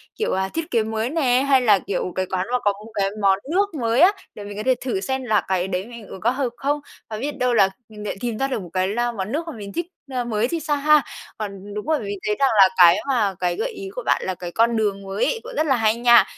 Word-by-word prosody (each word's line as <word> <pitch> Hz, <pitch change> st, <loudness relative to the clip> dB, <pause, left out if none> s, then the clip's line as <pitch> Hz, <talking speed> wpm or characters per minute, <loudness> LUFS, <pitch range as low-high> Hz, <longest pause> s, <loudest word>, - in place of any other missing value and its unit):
kiểu, 445 Hz, -, -1 dB
ờ, 190 Hz, 0 st, 0 dB
thiết 330 Hz, 0 st, -4 dB
kế 230 Hz, -2 st, +2 dB
mới 220 Hz, +2 st, -2 dB
nè, 260 Hz, -5 st, +2 dB
hay 270 Hz, -2 st, +5 dB
là, 210 Hz, -5 st, +5 dB
kiểu, 185 Hz, -1 st, -3 dB
cái 185 Hz, -, 0 dB
quán 185 Hz, +1 st, -2 dB
mà 250 Hz, -, +3 dB
có 205 Hz, -, +4 dB
một 225 Hz, -, -13 dB
cái 195 Hz, -2 st, +1 dB
món 195 Hz, -1 st, +4 dB
nước 400 Hz, +2 st, +1 dB
mới 230 Hz, +2 st, +2 dB
á, 365 Hz, +3 st, +8 dB, 0.2 s
để 205 Hz, -, -8 dB
mình 205 Hz, 0 st, -8 dB
có 210 Hz, -, -3 dB
thể 260 Hz, +1 st, +3 dB
thử 245 Hz, -6 st, -1 dB
xem 265 Hz, +4 st, -2 dB
là 215 Hz, -4 st, +2 dB
cái 185 Hz, -1 st, 0 dB
đấy 185 Hz, 0 st, -2 dB
mình 235 Hz, -4 st, -11 dB
uống 190 Hz, -, -10 dB
có 230 Hz, -, +3 dB
hợp 260 Hz, -1 st, -1 dB
không. 290 Hz, +2 st, 0 dB, 0.3 s
Và 215 Hz, -, -4 dB
biết 275 Hz, +4 st, -4 dB
đâu 250 Hz, -1 st, +1 dB
là 200 Hz, -4 st, +5 dB, 0.2 s
mình 210 Hz, -1 st, -10 dB
lại -, -, -3 dB
tìm 235 Hz, -1 st, -3 dB
ra 270 Hz, -, 0 dB
được 260 Hz, -5 st, -3 dB
một 175 Hz, -, -9 dB
cái, 185 Hz, 0 st, +1 dB
a, 240 Hz, 0 st, +1 dB
món 205 Hz, -2 st, -4 dB
nước 310 Hz, +5 st, -1 dB
mà 325 Hz, -, -5 dB
mình 200 Hz, -2 st, -8 dB
thích, 345 Hz, -, -2 dB, 0.3 s
ơ, 250 Hz, -1 st, -1 dB
mới 230 Hz, -1 st, 0 dB
thì 335 Hz, +5 st, -2 dB
sao 295 Hz, -1 st, 0 dB
ha? 300 Hz, +1 st, +5 dB, 0.4 s
Còn, 200 Hz, -1 st, -6 dB
đúng 210 Hz, 0 st, -5 dB
rồi, 310 Hz, 0 st, +1 dB
mình 205 Hz, -2 st, -4 dB
thấy 210 Hz, -, +1 dB
rằng 275 Hz, -1 st, +4 dB
là 195 Hz, -1 st, +8 dB
cái 175 Hz, 0 st, +8 dB
mà 215 Hz, -7 st, +1 dB
cái 180 Hz, -1 st, 0 dB
gợi -, -, -2 dB
ý 390 Hz, -2 st, -7 dB
của -, -, -4 dB
bạn -, -, +2 dB
là 185 Hz, -, -2 dB
cái 175 Hz, -1 st, -7 dB
con 230 Hz, +4 st, +2 dB
đường 205 Hz, -2 st, 0 dB
mới 195 Hz, +1 st, -1 dB
ấy 485 Hz, -, -1 dB
cũng -, -, -8 dB
rất 310 Hz, -, +1 dB
là 270 Hz, -, +4 dB
hay 220 Hz, -2 st, +2 dB
nha. 240 Hz, 0 st, +6 dB
225 Hz, 295 wpm, -22 LUFS, 200-270 Hz, 0.4 s, á